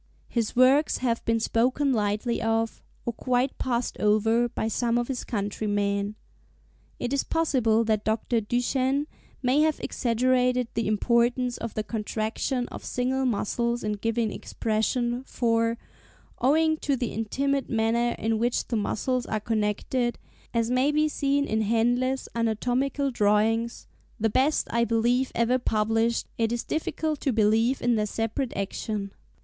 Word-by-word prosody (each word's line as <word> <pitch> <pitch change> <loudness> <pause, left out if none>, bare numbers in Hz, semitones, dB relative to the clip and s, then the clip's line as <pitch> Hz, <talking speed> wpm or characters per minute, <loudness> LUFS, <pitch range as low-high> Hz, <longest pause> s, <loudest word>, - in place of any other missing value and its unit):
His 230 -3 -1
works 265 +4 +4
have 235 -2 -1
been 230 0 +2
spoken 255 +5 +1
lightly 215 +2 0
of, 225 0 0 0.2
or 235 - -1
quite 255 +3 0
passed 245 -2 -1
over, 225 +3 +3
by 220 - -2
some 235 +1 0
of 240 0 0
his 260 -2 -3
countrymen. 205 -1 -1 0.8
It 245 +2 -3
is 280 - +1
possible 250 -9 +2
that 215 -2 0
Dr. 220 +1 0
Duchenne 260 +5 0 0.4
may 260 +4 +3
have 310 -1 +2
exaggerated 250 0 +1
the 230 -1 -1
importance 235 +3 +2
of 230 -2 -6
the 215 - -1
contraction 225 +3 -2
of - - -8
single 260 +2 -1
muscles 235 +1 -1
in 210 - -1
giving 225 +1 -1
expression; 240 +4 -1
for, 230 -2 0 0.6
owing 315 +5 +3
to 285 -2 0
the 245 -2 -3
intimate 275 +5 -1
manner 230 +1 +1
in 220 0 0
which 240 +1 0
the 235 - 0
muscles 245 +4 -1
are 215 - -1
connected, 225 +3 -1 0.3
as 230 0 0
may 255 +3 +3
be 305 +1 +2
seen 280 -1 0
in 220 -3 0
Henle's 245 +4 +1
anatomical 245 +5 0
drawings—the 225 +1 0
best 270 +7 +2
I 235 0 +2
believe 240 +3 +1
ever 240 +2 +2
published 225 0 +1
it 225 0 +1
is 240 0 -1
difficult 315 -1 -2
to 275 - +1
believe 225 +3 +2
in 240 -1 +3
their 210 0 0
separate 225 +5 -2
action. 200 +1 -3
235 Hz, 145 wpm, -26 LUFS, 220-255 Hz, 0.8 s, works